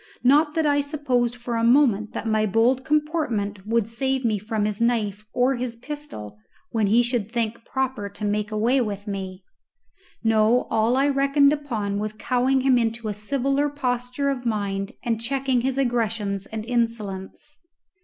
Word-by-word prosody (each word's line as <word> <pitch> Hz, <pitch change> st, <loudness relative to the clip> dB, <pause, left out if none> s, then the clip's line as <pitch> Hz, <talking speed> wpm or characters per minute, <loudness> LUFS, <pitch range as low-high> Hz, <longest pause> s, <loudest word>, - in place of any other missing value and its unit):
Not 295 Hz, +4 st, +4 dB
that 320 Hz, -1 st, +1 dB
I 285 Hz, -1 st, +3 dB
supposed 260 Hz, -5 st, 0 dB
for 245 Hz, 0 st, -5 dB
a 230 Hz, 0 st, 0 dB
moment 230 Hz, -4 st, +3 dB
that -, -, -4 dB
my 215 Hz, -1 st, +2 dB
bold 235 Hz, +6 st, +2 dB
comportment 260 Hz, -, -1 dB
would 230 Hz, -1 st, +1 dB
save 265 Hz, +2 st, -1 dB
me 215 Hz, -3 st, +1 dB
from 215 Hz, 0 st, -2 dB
his 210 Hz, +1 st, -2 dB
knife 215 Hz, -3 st, 0 dB
or 250 Hz, +1 st, +2 dB
his 240 Hz, -1 st, -3 dB
pistol 230 Hz, -, -8 dB, 0.3 s
when 220 Hz, -3 st, +1 dB
he 230 Hz, +4 st, +4 dB
should 235 Hz, -3 st, -2 dB
think 230 Hz, -1 st, -2 dB
proper 260 Hz, -6 st, -2 dB
to 200 Hz, +1 st, -6 dB
make 210 Hz, +1 st, -1 dB
away 235 Hz, +5 st, +2 dB
with 205 Hz, -3 st, -3 dB
me. 190 Hz, -2 st, -5 dB, 0.8 s
No. 225 Hz, +2 st, +3 dB
All 225 Hz, +3 st, +2 dB
I 275 Hz, +1 st, +3 dB
reckoned 280 Hz, +1 st, +4 dB
upon 220 Hz, -9 st, -2 dB
was 215 Hz, 0 st, -3 dB
cowing 255 Hz, +3 st, +1 dB
him 255 Hz, -2 st, +4 dB
into 225 Hz, -1 st, -1 dB
a -, -, -2 dB
civiller 275 Hz, +6 st, 0 dB
posture 255 Hz, 0 st, -1 dB
of 255 Hz, -2 st, -4 dB
mind, 200 Hz, -4 st, -2 dB
and 230 Hz, -2 st, -1 dB
checking 265 Hz, 0 st, 0 dB
his 265 Hz, +1 st, -1 dB
aggressions 225 Hz, -6 st, -1 dB
and 220 Hz, -1 st, -5 dB
insolence. 230 Hz, +2 st, -3 dB
235 Hz, 165 wpm, -24 LUFS, 215-265 Hz, 0.8 s, Not